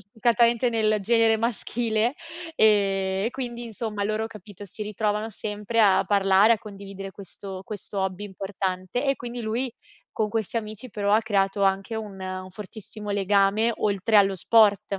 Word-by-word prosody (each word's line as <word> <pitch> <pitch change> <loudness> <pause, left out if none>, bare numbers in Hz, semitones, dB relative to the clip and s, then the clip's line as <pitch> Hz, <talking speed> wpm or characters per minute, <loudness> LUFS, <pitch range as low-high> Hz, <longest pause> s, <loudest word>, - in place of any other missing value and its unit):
spiccatamente 235 +3 +2
nel 215 -2 +1
genere 225 +2 +3
maschile 230 +1 0 0.4
e 200 -5 +3 0.2
e - - -1
quindi 240 -2 -5
insomma 220 -2 -4
loro, 215 +2 -1
capito, 205 -2 -11
si 200 +2 -8
ritrovano 210 +1 -1
sempre 210 +2 -4
a 195 -3 +5
parlare, 200 +1 +4
a - - -7
condividere 195 -2 -9
questo 195 0 -9
questo 205 0 -7
hobby 190 +1 -2
importante, 190 +3 -3
e 275 -1 +2
quindi 240 0 -6
lui 235 +3 -2 0.4
con 215 - -1
questi 220 0 -2
amici 215 +2 -5
però 205 -1 0
ha 215 - +5
creato 200 -2 +1
anche 195 +3 +1
un 210 -3 -6
un 185 0 -5
fortissimo 210 +1 -9
legame 200 +3 +2
oltre 205 +1 +1
allo 195 -1 +5
sport. 205 0 +3
210 Hz, 150 wpm, -25 LUFS, 195-225 Hz, 0.4 s, a